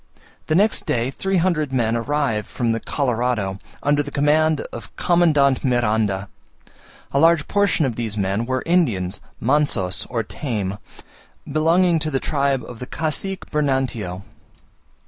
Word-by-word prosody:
The 155 - +1
next 210 +5 +2
day 120 +2 0
three 190 +6 -1
hundred 165 -5 +1
men 120 -3 +1
arrived 115 -3 -1
from 120 -2 -1
the 115 - -1
Colorado, 120 -9 -1 0.2
under 145 0 +3
the 145 - -5
command 150 +2 +2
of 115 -5 -8
Commandant 150 -6 +3
Miranda. 110 -6 +1 0.8
A 140 - +2
large 165 -1 +4
portion 200 -6 +2
of 125 -4 -2
these 110 -3 -3
men 100 +3 -1
were 130 0 -1
Indians 110 - +1 0.2
(mansos, 125 -9 +1
or 115 -2 -1
tame), 105 -5 -4 0.7
belonging 165 +3 +3
to 155 0 -2
the 135 -3 0
tribe 140 -3 0
of 120 -2 -10
the 125 - -6
Cacique 165 +6 -3
Bernantio. 130 - -1
135 Hz, 140 wpm, -21 LUFS, 115-155 Hz, 0.8 s, large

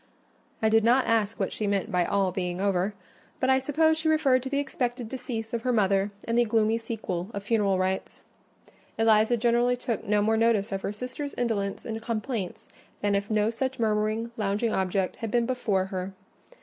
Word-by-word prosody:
I 220 - +5
did 225 0 +4
not 245 +3 +4
ask 225 0 +1
what 195 - -1
she 215 - -2
meant 200 +2 0
by 180 -2 +2
"all 195 -2 +1
being 180 -1 -3
over," 195 +1 0 0.4
but 260 0 +2
I 265 - +4
suppose 315 +4 +2
she 315 0 +1
referred 280 -5 +3
to 265 - -5
the 280 - -1
expected 250 -4 -2
decease 230 -2 -5
of 235 - -1
her 250 +1 0
mother 200 -3 +2 0.2
and 230 - 0
the - - +6
gloomy 225 0 +2
sequel 210 -5 -4
of 200 - -4
funeral 205 -3 +2
rites. 185 +1 -2 0.7
Eliza 225 +1 +4
generally 240 +1 +2
took 240 -2 -3
no 205 0 +2
more 220 +1 +2
notice 225 -2 +2
of 195 0 -2
her - - -2
sister's 255 +6 -6
indolence 210 -5 -2
and 225 -1 -4
complaints 225 -3 -4 0.3
than 205 0 +1
if 200 0 -1
no 215 0 +2
such 260 +3 -3
murmuring, 220 0 0
lounging 210 +2 0
object 190 0 0
had 225 - -4
been 235 +2 +2
before 220 -7 0
her. 185 +1 -3
220 Hz, 190 wpm, -27 LUFS, 200-240 Hz, 0.7 s, the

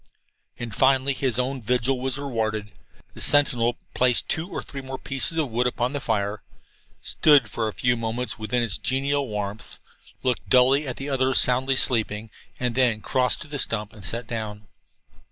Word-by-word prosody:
And 120 -3 -6
finally 135 +2 +3
his 125 -3 -1
own 130 +1 -1
vigil 125 +3 0
was 130 0 -1
rewarded. 110 -6 -3 0.4
The - - -8
sentinel 125 -4 +3 0.2
placed 125 -1 +2
two 160 +3 0
or - - -5
three 140 - -8
more 130 0 -6
pieces 135 +5 0
of 150 -6 -1
wood 120 +2 +1
upon 125 +2 -2
the 145 - -2
fire, 105 -4 -2 0.6
stood 145 -6 +4
for 115 -1 -2
a 110 - -4
few 120 -1 +1
moments 115 +2 -4
within 110 +3 -1
its 110 -4 +2
genial 140 +1 0
warmth, 105 -1 -5 0.5
looked 125 -2 -1
dully 130 +3 +4
at 125 - -5
the 135 - -6
others 130 -1 +2
so - - +8
soundly 130 +2 +1
sleeping, 110 -4 +1 0.3
and 125 -1 -1
then 120 -4 +2
crossed 125 +2 +1
to 155 - -6
the 145 -1 -5
stump 105 -3 -1
and 105 - -13
sat 115 +5 +1
down. 110 -2 -6
125 Hz, 180 wpm, -24 LUFS, 110-135 Hz, 0.6 s, so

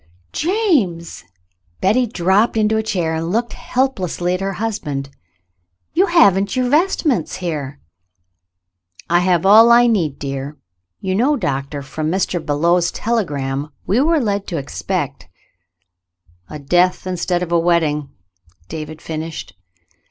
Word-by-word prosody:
"James!" 295 - 0 0.5
Betty 240 +6 +2
dropped 205 +3 +1
into 215 0 +2
a 220 - +2
chair 180 -7 -1
and 165 +1 -2
looked 235 +3 -1
helplessly 185 -9 -1
at 185 - -2
her 195 0 -2
husband. 150 -10 -4 0.8
"You 380 +3 +3
haven't 200 - +4
your 255 -1 +1
vest 340 +5 +2
ments 240 - 0
here! 150 -6 -4 0.7
" 90 -1 -28
"I 175 - +5
have 180 -1 +1
all 220 +4 +8
I 240 +1 +7
need, 175 - +1
dear. 140 +1 -5 0.4
You 190 -1 -1
know. 255 +9 +2
Doctor, 140 - -3
from 155 +3 -4
Mr. 180 -1 -1
Belew's 170 +4 +1
telegram 145 - -2 0.2
we 205 +6 +2
were 325 +2 +3
led 205 -5 -1
to 170 - -3
expect 90 - -4 0.3
— 90 +1 -55
" 90 - -63 0.3
"A - - -6
death 175 +7 +1
instead 180 -1 -1
of 170 - -6
a 170 - +3
wedding.''" 160 -4 +1 0.6
David 155 0 -7
finished. 160 -7 -6
175 Hz, 140 wpm, -19 LUFS, 145-220 Hz, 0.8 s, all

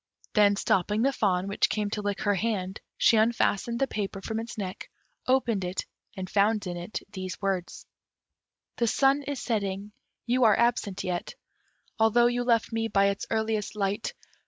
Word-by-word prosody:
Then 205 -2 +5
stopping 205 +3 +1
the 275 +1 +2
fawn, 190 -5 +1
which 200 - +1
came 210 -1 -1
to 210 - -2
lick 205 0 -2
her 205 - +2
hand, 195 -2 -2 0.2
she 225 - +5
unfastened 230 0 +2
the 270 - +2
paper 205 -5 -4
from 220 +3 -3
its 230 +1 -7
neck, 190 -3 -5 0.4
opened 245 -6 +2
it, 180 +1 -3 0.3
and 185 -1 -4
found 205 +1 +2
in 180 -1 -4
it 175 +4 -5
these 185 -2 -6
words: 190 -3 -3 0.9
The 235 - +1
sun 275 +5 +3
is 285 -1 -4
setting, 205 -3 -2 0.3
you 250 +1 +2
are 215 -2 +5
absent 235 -5 +1
yet, 180 -1 -3 0.6
Although 225 +2 +5
you 245 0 +1
left 235 -2 +2
me 225 0 0
by 200 -2 +3
its 200 - -3
earliest 220 -2 -1
light! 205 +1 -2
210 Hz, 170 wpm, -27 LUFS, 195-230 Hz, 0.9 s, Then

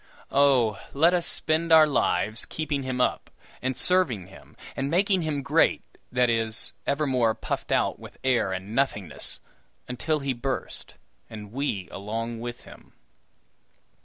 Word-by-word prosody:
Oh, 130 -6 +3
let 165 +5 +4
us 175 -1 +2
spend 160 +1 0
our 160 -1 +9
lives 110 -6 +1
keeping 150 -3 -3
him 130 -1 -3
up, 125 - 0 0.3
and 130 0 -2
serving 130 - +2
him, - - -16 0.2
and 135 +1 -2
making 190 +3 +2
him 150 -3 -2
great - - +3 0.3
that 125 0 +3
is, 115 -1 -1
evermore 130 -6 +2
puffed 110 - -4
out - - +1
with - - -12
air 125 -7 +2
and 95 +3 -5
nothingness 105 - -1 0.5
until 140 +5 -1
he 140 -2 -2
burst, 125 +2 -4 0.3
and 105 -2 -9
we 120 -8 -2
along 115 +3 -4
with 120 +1 -6
him! - - -15
125 Hz, 140 wpm, -26 LUFS, 110-145 Hz, 0.5 s, our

